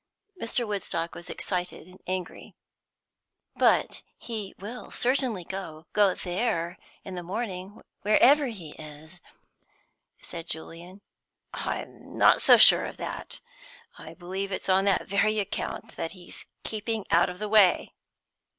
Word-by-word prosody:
Mr. 230 +1 -1
Woodstock 180 -5 -2
was 175 +1 -9
excited 180 -3 -3
and 185 +1 -17
angry. 185 -2 -5 1.0
"But - - +3 0.2
he 215 -5 -6
will 220 +6 -8
certainly 245 -6 +1
go 165 -4 -7
go 200 -3 +4
there 175 -2 -1 0.3
in 190 - -7
the 180 - -4
morning, 190 0 -5 0.2
wherever 265 +8 +5
he 185 -10 -7
is," 155 +3 -11 1.0
said 165 0 -8
Julian. 170 +4 -8 0.5
"I'm - - -5
not - - +6
so - - +8
sure - - +8
of - - -7
that. - - -5 0.5
I - - -11
believe 190 +2 -4
it's 190 - -4
on 190 +1 +4
that 200 - +2
very 215 +2 +2
account 200 -2 -3
that 165 - -3
he's 180 -2 -10 0.2
keeping 220 -1 -3
out 170 +2 +5
of 180 - -7
the 210 - -3
way!" 205 -4 +4
190 Hz, 130 wpm, -27 LUFS, 175-215 Hz, 1.0 s, so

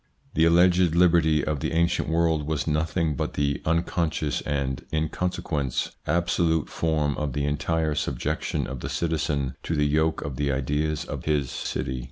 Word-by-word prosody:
The 80 - +4
alleged 85 0 +4
liberty 85 -4 +4
of 75 -2 -1
the - - -2
ancient 85 -1 +1
world 80 -2 +1
was 80 -1 -1
nothing 80 0 0
but - - -3
the 70 -1 0
unconscious 80 -2 0
and, 70 -2 -1
in 80 0 0
consequence, 75 -7 -2 0.2
absolute 85 -2 +1
form 75 -3 0
of 75 -3 -2
the 70 +1 -1
entire 75 +2 0
subjection 75 - -2
of 65 0 -6
the - - -5
citizen 75 -5 -1
to 85 - -2
the 75 0 +2
yoke 80 +2 +1
of 70 -3 -5
the 70 -1 0
ideas 75 +3 -1
of - - -6
his 75 -4 0
city. 65 0 -3
75 Hz, 165 wpm, -25 LUFS, 75-80 Hz, 0.2 s, The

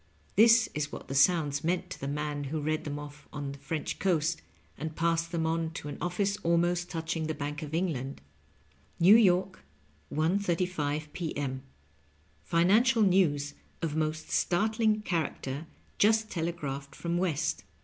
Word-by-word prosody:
This 225 +1 +7
is 150 -1 -2
what - - -8
the - - -3
sounds 145 0 +3
meant 180 +2 -1
to - - -6
the 140 - -3
man 145 0 -3
who 155 +3 -2
read 155 +1 -1
them 145 -1 -3
ofiE 145 0 -9
on 145 -2 -4
the 140 - -10
French 150 +2 -4
coast, 165 -3 +1 0.3
and 155 0 -5
passed 165 0 0
them 165 -2 0
on 165 0 0
to 150 - -6
an - - -7
of&ce 195 +3 0
almost 175 +1 +1
touching 160 -2 -2
the 155 - -2
Bank 145 0 -4
of 155 0 -4
England: 145 -7 -2 0.4
" 75 0 -34
New 185 +5 +8
York, 185 -3 +3 0.5
1.35 160 -3 0
p. 165 -5 -4
m. 130 -2 -3 0.8
Financial 215 +8 +4
news 150 -7 +2 0.3
of 155 -2 -1
most 155 0 -2
startling 215 +3 +2
char 165 -6 +1
acter 140 +4 -6 0.3
jast 220 +1 +3
telegraphed 145 -5 -4
from 170 0 -2
West. 170 -6 -1
165 Hz, 160 wpm, -29 LUFS, 145-180 Hz, 0.8 s, New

